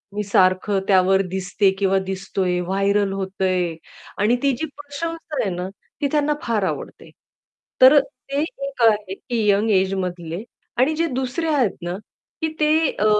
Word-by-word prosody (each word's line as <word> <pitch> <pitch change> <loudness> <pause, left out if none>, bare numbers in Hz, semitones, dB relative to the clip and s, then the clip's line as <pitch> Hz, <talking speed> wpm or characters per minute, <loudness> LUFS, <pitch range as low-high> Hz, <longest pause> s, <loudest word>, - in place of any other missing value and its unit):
मी 210 - -1
सारखं 190 +1 +2
त्यावर 190 0 +4
दिसते 190 +1 +1
किंवा 195 -1 +2
दिसतोय, 190 -1 -2
व्हायरल 195 +2 +1
होतंय. 190 -3 -1 0.4
आणि 215 +4 +3
ती 280 - +4
जी 320 - -2
प्रशंसा 310 +2 -6
आहे 200 - 0
ना, 180 +1 -4 0.3
ती 285 - +2
त्यांना 300 0 +2
फार 220 -4 0
आवडते. - - -4 0.7
तर 265 +3 +9
ते 275 +1 -4
एक 275 -4 -5
आहे 210 -4 +3
की 230 0 -2
यंग 205 +3 +3
एज 190 -1 +2
मधले 175 +1 -5 0.3
आणि 270 +5 +3
जे 330 +1 +1
दुसरे 260 +4 -2
आहेत 250 -9 +2
ना, 175 +1 -3 0.5
की 320 - +1
ते 300 - +3 0.3
अ, 210 - +2
200 Hz, 155 wpm, -22 LUFS, 190-275 Hz, 0.7 s, तर